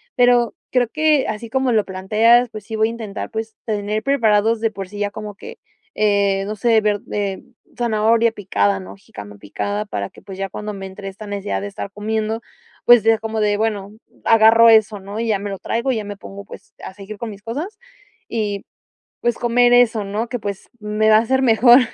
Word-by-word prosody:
Pero 245 -2 +3 0.2
creo 250 -2 +2
que 305 +1 +2
así 220 +1 -5
como 265 0 +1
lo 215 -2 +2
planteas, 220 +6 +3
pues, 215 -2 -9
sí 220 - -5
voy 220 0 +2
a - - -4
intentar, 220 -4 -6
pues, 220 0 -5
tener 210 0 -2
preparados 225 -4 +2
de 225 -1 +1
por 195 -2 -7
sí 205 +1 -9
ya 205 0 0
como 210 -1 -7
que, 465 - -11 0.4
eh, 200 -2 +2
no 215 - -4
sé, 225 0 +3
verd 210 -1 0
eh, 200 -2 -2 0.4
zanahoria 230 0 +2
picada, 100 - 0
¿no? 95 +1 -10
Jícama 100 +1 -12
picada 205 - -4
para 100 - -4
que, - - -17
pues 195 -2 -10
ya 195 0 -3
cuando 210 +3 -6
me 195 -1 -7
entre 195 +1 -9
esta 195 +3 -8
necesidad 205 0 -3
de 205 - -4
estar 200 0 -6
comiendo, 220 +2 -2 0.4
pues 240 -2 +7
ya 225 0 +4
como 220 0 -4
de 210 -1 +2
bueno, 210 -3 -2 0.3
agarro 225 +1 +6
eso, 215 -2 +4
¿no? 200 +3 -7
Y 230 - -2
ya 210 -3 +1
me 205 +1 -5
lo 195 - -5
traigo 235 +4 -1
y - - -2
ya 215 - -3
me 205 0 -7
pongo, 200 0 -10
pues - - -13
a - - -7
seguir 200 +2 -10
con 230 +2 -5
mis 205 0 -11
cosas 310 - -5 0.5
y, 205 -3 -3 0.6
pues, 240 -1 0
comer 240 0 +3
eso, 235 -3 +4
¿no? 210 +4 -3
Que, 245 - -3
pues, 200 -2 -6
me 210 +1 0
va 215 - +8
a - - +6
hacer 260 +4 +1
mejor, 240 +1 +7
215 Hz, 215 wpm, -20 LUFS, 200-230 Hz, 0.6 s, va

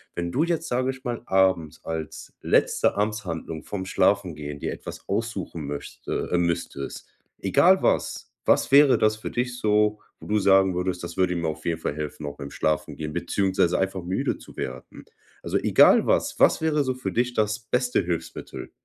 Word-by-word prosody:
wenn 85 0 -3
du 145 - +1
jetzt, 170 -1 -1
sage 130 0 0
ich 130 0 -13
mal, 120 -1 -4
abends 95 -5 +1
als 80 -1 -6
letzte - - +2
Amtshandlung 90 -7 -3
vorm 95 -2 -5
Schlafengehen 90 -7 0
dir - - -3
etwas - - -9
aussuchen 100 -7 -3
möchte 70 0 -5
äh, 90 - +3
müsstest, 85 -5 -3 0.3
egal 175 - +4
was, - - 0
was - - +3
wäre 140 0 +7
das 110 0 +3
für 110 - -6
dich 125 0 -2
so, 105 -2 +2 0.2
wo - - -11
du 105 - +1
sagen 95 -1 +4
würdest: 90 0 -2
„Das 85 - -7
würde 90 -1 +2
mir 85 -1 -1
auf 80 0 -5
jeden 85 -1 -1
Fall 75 - -3
helfen, 75 0 -5
auch 70 0 -6
beim 70 -1 -7
Schlafengehen 75 0 -2
beziehungsweise 95 -2 +1
einfach 95 -1 -2
müde 95 +2 -1
zu - - -15
werden“? - - -7 0.4
Also, - - -1
egal - - +5
was, - - +1
was - - +5
wäre 155 -2 +2
so 130 -1 -1
für 130 0 -4
dich 120 +1 0
das 110 -1 0
beste 125 +1 0
Hilfsmittel? 85 -1 -5
95 Hz, 180 wpm, -25 LUFS, 85-115 Hz, 0.4 s, wäre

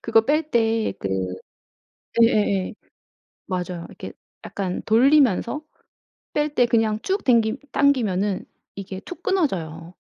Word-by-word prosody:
그거 225 -1 +4
뺄 305 +4 +1
때 225 -1 +1
그 95 - -3 1.1
예예예 205 -5 +2 0.8
맞아요. 180 -2 -3
이렇게 - - -9 0.3
약간 185 -2 -3
돌리면서 260 +2 +3 0.7
뺄 295 0 0
때 245 - +4
그냥 225 -2 +2
쭉 390 +2 -1
댕기 230 -1 +3
당기면은 210 -9 +1 0.3
이게 195 -1 -6
툭 360 - -10
끊어져요. 175 - -1
225 Hz, 225 characters per minute, -23 LUFS, 190-280 Hz, 1.1 s, 그거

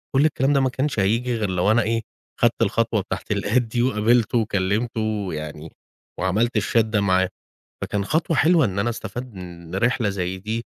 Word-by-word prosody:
كُلّ 140 - +5
الكلام 145 -2 +2
ده 140 - +4
ما 130 -1 +2
كانش 130 -2 -2
هييجي 115 +5 +1
غير 105 -3 -1
لو 90 +3 +2
أنا 120 +2 +4
إيه 115 +1 0 0.4
خدت - - +2
الخطوة - - +1
بتاعة - - -4
الAdd 110 +5 0
دي 120 0 -2
وقابلته 120 0 +2
وكلمته 110 0 -1
يعني، 75 +1 -6 0.5
وعملت 105 +6 +1
الchat 110 +3 +2
ده 110 -1 0
معاه، 95 -1 +2 0.5
فكان 100 -1 -2
خطوة 160 +3 0
حلوة 160 -3 +4
إن 100 -1 -2
أنا 120 +4 +1
استفدت 120 +1 -6
من 85 -1 -9
رحلة 115 +1 +1
زي 95 -1 -3
دي، 110 +4 -4
110 Hz, 180 wpm, -23 LUFS, 95-120 Hz, 0.5 s, كُلّ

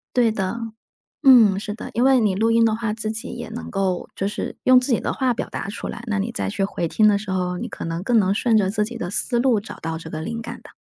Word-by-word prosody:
对 240 -3 +4
的。 195 +1 -2 0.7
嗯， 225 -8 +7
是 210 0 -5
的， 220 - -8
因 240 - +1
为 270 -1 +6
你 205 -3 +2
录 220 +4 +1
音 230 0 +4
的 225 -1 +3
话 225 -1 -2
自 220 0 -3
己 220 +3 -5
也 - - -7
能 235 +2 -7
够 190 -3 -1
就 195 - -2
是 205 - -4
用 255 0 +7
自 250 +2 -2
己 - - +1
的 - - -1
话 260 -2 0
表 - - -4
达 - - -5
出 205 - -6
来， - - -6
那 210 -2 -1
你 200 +4 -2
再 230 - -3
去 200 -1 -2
回 175 -3 -2
听 215 +5 +4
的 205 - +3
时 200 0 -8
候， 180 -1 -1
你 - - -4
可 - - -7
能 165 +1 -3
更 235 +2 +3
能 195 -1 +2
顺 225 +2 +1
着 195 -3 +2
自 210 +1 0
己 235 +1 -7
的 175 - -4
思 240 +4 0
路 240 -3 +3
找 205 - -10
到 160 0 -3
这 160 0 -9
个 155 -1 -5
灵 230 +7 -4
感 230 - -8
的。 - - -13
215 Hz, 310 characters per minute, -22 LUFS, 195-230 Hz, 0.7 s, 嗯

